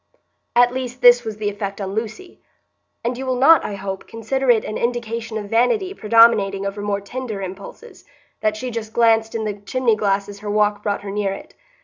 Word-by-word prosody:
At 245 0 +5
least 255 -1 -5
this 245 0 +7
was 220 -2 -5
the 215 -1 -3
effect 200 -1 -5
on 195 -1 -4
Lucy; 225 - -6 0.6
and 240 +2 -1
you - - -4
will 260 -1 -1
not, 280 +6 +6
I 205 - -4
hope, 195 -1 -6
consider 245 +4 -2
it 230 -3 +4
an 215 - -5
indication 230 -1 -3
of 205 -1 -7
vanity 370 - +2
predominating 215 - +4
over 200 +1 -4
more 205 -1 -2
tender 225 0 -6
impulses, 195 - -9 0.4
that 215 0 0
she 250 +2 -5
just 220 -1 -6
glanced 225 -1 +3
in 220 -1 -2
the 210 - -2
chimney 235 +2 +1
glass 200 -1 0
as 200 0 -10
her 210 0 -6
walk 210 0 +1
brought 205 -1 -2
her 200 - -5
near 200 -1 -1
it. - - -11
220 Hz, 205 wpm, -21 LUFS, 205-240 Hz, 0.6 s, this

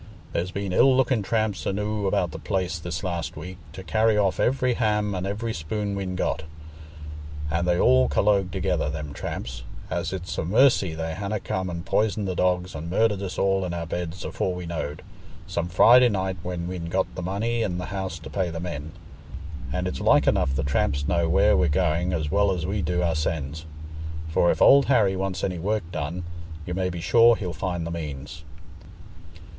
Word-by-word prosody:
There's 90 +2 -1
been 100 0 -3
ill 130 +6 +5
looking 130 -3 +2
tramps 105 -4 -1
enoo' 105 +1 -1
about 90 -2 +1
the - - -7
place 90 -3 -2
this 80 +1 -5
last 85 -5 -3
week, 90 +4 -8
to 95 - -8
carry 110 +5 +2
off 100 -3 +1
every 130 0 +2
ham 105 -3 +1
an' 95 0 -2
every 110 +3 -3
spoon 100 +5 -3
we'n 95 -2 -3
got; 85 - -1 1.1
and 85 +2 0
they 90 0 +2
all 65 0 +5
collogue 100 +5 +2
together, 90 -5 -1
them 75 -1 -5
tramps, - - -5 0.3
as - - -1
it's 90 -3 -4
a - - 0
mercy 100 - +3
they 80 0 -3
hanna 100 +3 -3
come 95 -1 -3
and 85 -1 -5
poisoned 105 -1 +1
the 95 - -1
dogs 90 0 0
and 80 +2 -6
murdered 105 +1 +2
us 95 -2 -5
all 95 0 +2
in 90 -1 -3
our 85 -1 -3
beds 85 +1 -4
afore 90 - -2
we 90 -1 -6
knowed, 80 -3 -4 0.4
some 85 0 -2
Friday 120 +7 +7
night 95 -3 -1
when 90 -1 -4
we'n 90 -2 -4
got 90 +1 -1
the 90 - -5
money 110 +6 -1
in 90 -5 -1
th' 90 - -5
house 95 -2 -4
to 80 - -10
pay 95 -3 0
the 85 0 -5
men. 80 -3 -5 0.8
And - - -1
it's - - -4
like - - +4
enough 65 0 +2
the 70 - 0
tramps 70 +1 0
know 85 -2 +1
where 80 - +4
we're 75 -1 +3
going 80 +4 +1
as 80 -4 -1
well 100 +2 +3
as 90 -4 -2
we 100 +2 -1
do 90 +2 0
oursens; 80 -2 -2 0.6
for 85 +2 +3
if - - +3
Old 140 0 +7
Harry 105 -8 +3
wants 95 -1 -3
any 90 -3 -1
work 105 +3 0
done, 85 +3 -3 0.4
you 90 - -4
may 90 0 0
be 85 -1 -5
sure 115 +5 +6
he'll 90 -5 -4
find 90 -3 -3
the 85 - -4
means." 75 -2 -6
90 Hz, 195 wpm, -25 LUFS, 85-100 Hz, 1.1 s, Friday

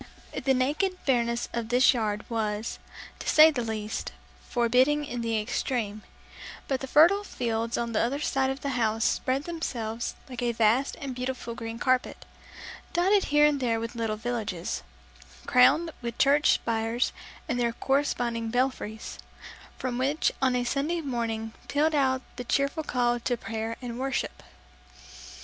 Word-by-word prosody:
The 265 -1 +4
naked 310 +9 0
barrenness 235 -3 +1
of 235 -1 -3
this 250 +2 +5
yard 215 -3 -2
was, 220 -1 -2 0.4
to - - -3
say 310 +1 +8
the 260 -5 -2
least, 220 -1 -4 0.4
forbidding 255 +5 +3
in 245 -4 -4
the 225 -1 0
extreme; 215 -1 -2 0.7
but 265 -2 0
the 270 - -5
fertile 340 +9 +5
fields 230 - -2
on 235 -1 -2
the 220 - +1
other 245 +5 0
side 270 -2 +1
of 270 +1 -4
the 280 - -2
house 225 -3 +1
spread 265 +2 0
themselves 235 -9 -4
like 250 -3 -6
a 240 -1 0
vast 230 +4 +2
and 275 -4 -4
beautiful 250 -1 -4
green 230 -1 -6
carpet, 255 +1 0 0.7
dotted 385 +4 +3
here 295 0 +4
and 295 -1 +3
there 230 -3 0
with 230 +1 -4
little 225 -2 -2
villages, 215 -7 -3 0.6
crowned 285 +7 +5
with 235 -1 -5
church 285 +2 +5
spires 225 +2 0 0.3
and 245 - -1
their 235 -1 +1
corresponding 240 -4 0
belfries, 245 -3 -2 0.6
from 250 -1 -3
which 280 +4 +1
on 260 -1 +3
a 245 - +1
Sunday 290 +7 -1
morning 230 -5 -3
pealed 305 +2 +2
out 260 -3 +2
the 245 - -4
cheerful 280 +5 0
call 240 -4 0
to 245 +1 -1
prayer 225 0 -4
and 240 0 -5
worship. 265 -1 -2
245 Hz, 155 wpm, -27 LUFS, 230-275 Hz, 0.7 s, say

